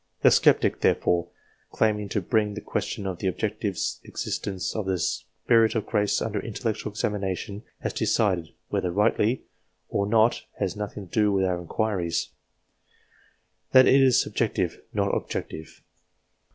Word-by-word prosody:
The - - +7
sceptic, - - +4
therefore, 85 -1 +2 0.4
claiming 105 -2 0
to 105 - -1
bring 105 +2 0
the - - -4
question 100 - -3
of 95 -2 -3
the 95 - -1
objective 105 0 -2 0.3
existence 95 -2 -4
of 105 -3 -2
the 95 -1 +1
Spirit 115 +6 +1
of 110 - 0
grace 105 -2 +1
under 110 -2 -2
intellectual 110 -1 -3
examination, 100 -1 -3 0.2
has - - -2
decided 90 -7 +1 0.2
whether 90 - 0
rightly 105 +5 +2 0.5
or 100 - 0
not 110 +2 +3 0.2
has - - -1
nothing 105 -2 -6
to - - -26
do 105 -1 +3
with 95 -1 +2
our 90 -1 -1
in 85 - -11
quiries 95 -7 -1 1.4
that 130 0 +9
it 135 +1 +6
is 130 -2 +5
subjective, - - -1
not - - 0
objective. 80 - -5
105 Hz, 145 wpm, -26 LUFS, 95-110 Hz, 1.4 s, that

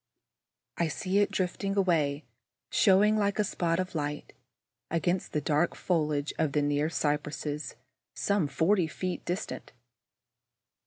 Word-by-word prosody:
I 170 - +2
see 185 +5 0
it 205 - +3
drifting 195 +2 -2
away, 155 -6 +1 0.5
showing, 210 +2 +5
like 200 -1 +1
a 210 - +3
spot 170 -3 0
of 185 0 -2
light, 150 -2 -3 0.6
against 175 +2 0
the 150 - 0
dark 155 +3 +1
foliage 150 -4 0
of 150 -3 +1
the 150 - +2
near 145 +1 +1
cypresses, 150 -1 -2 0.4
some 200 -6 +1
forty 170 +5 +2
feet 180 +2 -4
distant. 180 +4 -4
165 Hz, 125 wpm, -29 LUFS, 150-190 Hz, 0.6 s, showing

